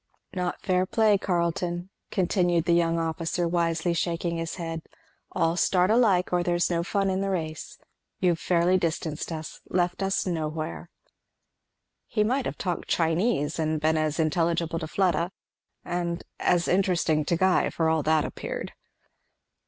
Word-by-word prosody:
"Not 180 -1 -3
fair 185 0 +1
play, 215 -2 +3
Carleton," 175 0 -1 0.2
continued 175 -3 +1
the 170 - +3
young 170 -1 +2
officer, 165 +1 -1
wisely 170 0 0
shaking 170 0 -1
his 165 0 -3
head, 165 -2 -4 0.5
"all 165 -2 +1
start 180 +2 +3
alike, 205 -7 +3
or 175 - +3
there's 175 0 +1
no 170 -1 +1
fun 195 +2 0
in 190 +1 -1
the 195 - -1
race. 160 -4 -4 0.4
You've 175 -3 +2
fairly 180 +1 +2
distanced 160 -2 -2
us 160 -1 -6
left 180 +1 0
us 195 0 0
nowhere." 160 -1 -3 1.2
He 215 -3 +1
might 255 +5 0
have - - -5
talked 180 -3 -3
Chinese 165 -2 +1
and 155 0 0
been 155 +1 +2
as 155 0 0
intelligible 165 +1 +1
to 160 - -5
Fleda, 175 0 +1 0.5
and 175 -1 -2 0.2
as 175 -1 +2
interesting 175 -5 +2
to 170 - +1
Guy, 190 +1 +3
for 165 - 0
all 160 -1 +2
that 155 +1 +2
appeared. - - -5
170 Hz, 150 wpm, -26 LUFS, 165-185 Hz, 1.2 s, play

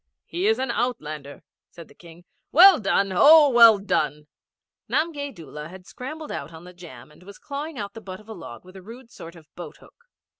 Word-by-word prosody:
'He 360 +4 -3
is 445 - +2
an 260 -2 -3
outlander,' 155 - -5 0.3
said 170 -2 -14
the - - -20
King. 170 0 -17 0.3
'Well 370 +2 +7
done! 195 -1 0
Oh, 295 - +6
well 230 -3 +7
done!' 150 -6 -2 0.6
Namgay 290 -3 -2
Doola 150 - -11
had 180 +1 -14
scrambled 300 +8 -9
out 140 +3 -7
on 160 0 -13
the 180 0 -13
jam 155 -8 -14
and 150 - -21
was 200 +2 -14
clawing 290 +1 -7
out 200 -1 -6
the 225 - -11
butt 185 -2 -10
of 215 - -19
a 220 - -8
log 120 - -12
with 185 +1 -16
a 190 - -11
rude 230 +5 -14
sort 165 +1 -12
of 165 -2 -16
boat 175 - -11
hook. 475 - -23
200 Hz, 210 wpm, -23 LUFS, 165-270 Hz, 0.6 s, Well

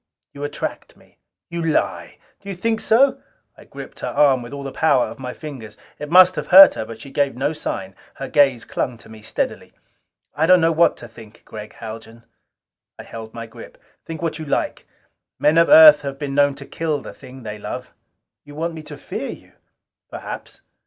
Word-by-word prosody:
You 140 - -8
attract 145 0 -5
me." - - -25 0.3
"You 170 0 -3
lie!" 160 -2 -1 0.2
"Do 200 - -10
you 195 - -4
think 225 +5 -1
so?" 265 +6 +3 0.3
I - - -17
gripped - - -11
her - - -4
arm 135 -4 +3
with 120 +1 -10
all 140 0 -7
the 135 - -6
power 140 -5 +2
of - - -10
my 125 -1 -5
fingers. 130 -7 -10 0.2
It 150 - -6
must 185 +2 +7
have - - -4
hurt 190 +1 +9
her 110 - -5
but 115 0 -10
she 140 - -11
gave 140 -2 0
no 140 +5 -1
sign; 95 -10 -5 0.2
her 135 - -6
gaze 135 -6 +2
clung 125 -2 -3
to 110 - -17
me 110 -1 -12
steadily. 105 - -4 0.6
"I 160 +2 +1
don't 185 0 +6
know 165 0 +3
what 165 +1 +3
to 120 - -10
think, 110 -1 -16
Gregg 105 -1 -10
Haljan...." 115 +1 -10 0.7
I - - -9
held 110 -1 -10
my 115 0 -6
grip. 110 - -13 0.3
"Think 165 0 -8
what 160 -1 -2
you 155 - -6
like. 140 - -2 0.5
Men 155 +2 +3
of 170 - +4
Earth 310 0 +9
have 140 -1 -6
been 140 -1 -5
known 145 0 +3
to 140 0 -10
kill 155 -2 -3
the - - -9
thing 130 -1 -13
they 105 -1 -7
love." - - -7 0.5
"You 145 0 -13
want 165 +2 -3
me 160 - -8
to 150 -1 -10
fear - - -6
you?" - - -11 0.6
"Perhaps." - - -8
145 Hz, 205 wpm, -21 LUFS, 120-165 Hz, 0.7 s, hurt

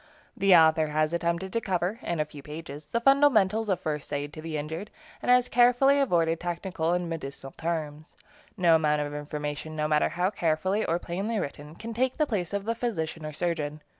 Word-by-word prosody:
The 195 -2 +5
author 160 -1 +5
has 155 +1 0
attempted 170 +2 -1
to 230 - 0
cover, 190 +2 -1
in 170 -2 -3
a 150 - +1
few 150 -1 -11
pages, 150 0 -8
the 195 +10 -1
fundamentals 230 -6 +4
of 185 - +1
first 150 -2 -4
aid 145 0 -3
to 155 - -8
the 160 -1 -4
injured, 160 +7 -5 0.3
and - - -3
has 250 0 +5
carefully 245 +4 +4
avoided 165 - +2
technical 175 -1 -2
and 180 -1 -1
medicinal 140 -4 -6
terms. 155 -2 -4 0.4
No 175 -3 +4
amount 150 -2 +3
of 145 0 -5
information, 150 +1 -5
no 150 0 0
matter 150 0 +2
how 180 +3 0
carefully 185 +3 0
or 165 - 0
plainly 195 +6 -3
written, 150 -3 -5
can 230 +5 -7
take 255 +3 0
the 305 - +3
place 200 - -2
of 200 0 -3
the 230 - 0
physician 165 -10 -3
or - - -5
surgeon. 155 -2 -2
170 Hz, 195 wpm, -27 LUFS, 155-200 Hz, 0.4 s, The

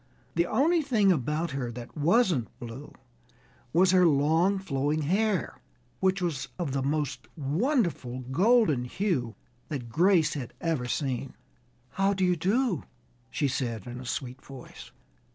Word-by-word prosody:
The 170 +1 +1
only 315 +9 +3
thing 225 -9 +3
about 155 +2 -1
her 130 -3 -3
that 120 0 -9
wasn't 165 - +2
blue 120 +4 -9 0.8
was 180 +5 +4
her 180 -2 +5
long 160 +6 +3
flowing 150 -4 -1
hair, 195 +3 0 0.4
which 190 0 +1
was 140 -6 -2
of 165 -6 -2
the 135 0 -1
most 145 -1 -2
wonderful 155 - 0
golden 150 - +3
hue 125 - -1 0.3
that 130 -7 -5
Grace 170 - +3
had 130 -6 -6
ever 160 -7 -1
seen. 135 -1 -2 0.6
"How 195 +1 +1
do 190 -1 +1
you 180 0 +3
do?" 195 - +1 0.5
she 145 - 0
said 120 -6 -3
in 125 0 -7
a - - -9
sweet 130 +2 -4
voice. 135 -2 -11
155 Hz, 140 wpm, -28 LUFS, 130-190 Hz, 0.8 s, her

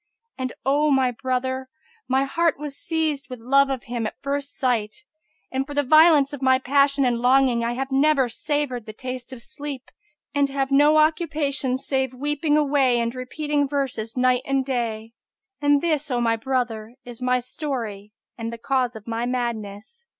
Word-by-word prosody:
And, 260 -1 -4
O 290 +3 +3
my 265 -3 +3
brother, 260 +1 -2 0.4
m, 265 +1 +3
heart 335 +3 +1
was 295 -1 -6
seized 315 -4 -2
with 255 -2 -7
love 275 +4 +3
of 265 -3 -3
him 235 -2 -3
at - - -9
first 280 0 -3
sight; 245 - -1 0.5
and, 265 +1 -2
for 290 - -7
the 290 - +2
violence 310 0 +6
of 285 - -6
my 260 -1 +4
passion 275 +1 +2
and 240 -2 +1
longing, 250 -1 +3
I 235 +1 -1
have 270 +2 -4
never 275 -1 +3
savoured 255 -1 -3
the 215 - -7
taste 255 +1 -7
of 245 -3 -9
sleep 290 -4 -7 0.4
and 285 -1 +2
have 270 0 -2
no 295 +2 +5
occupation 305 -4 +1
save 265 -1 -2
weeping 295 +2 0
alway 275 -4 +3
and 235 0 -1
repeating 285 +3 -1
verses 260 -5 -3
night 250 0 +3
and 270 -1 0
day. 230 -4 -3 0.5
And 290 -1 +4
this, 305 -3 0
O 245 -2 0
my 230 -1 +2
brother, 230 -2 -2
is 245 0 -9
my 250 0 +2
story 240 -6 -5 0.3
and 230 0 -3
the 235 - -6
cause 250 0 0
of 220 -1 -10
my 230 +1 -2
madness." 235 - -4
265 Hz, 175 wpm, -23 LUFS, 245-285 Hz, 0.5 s, violence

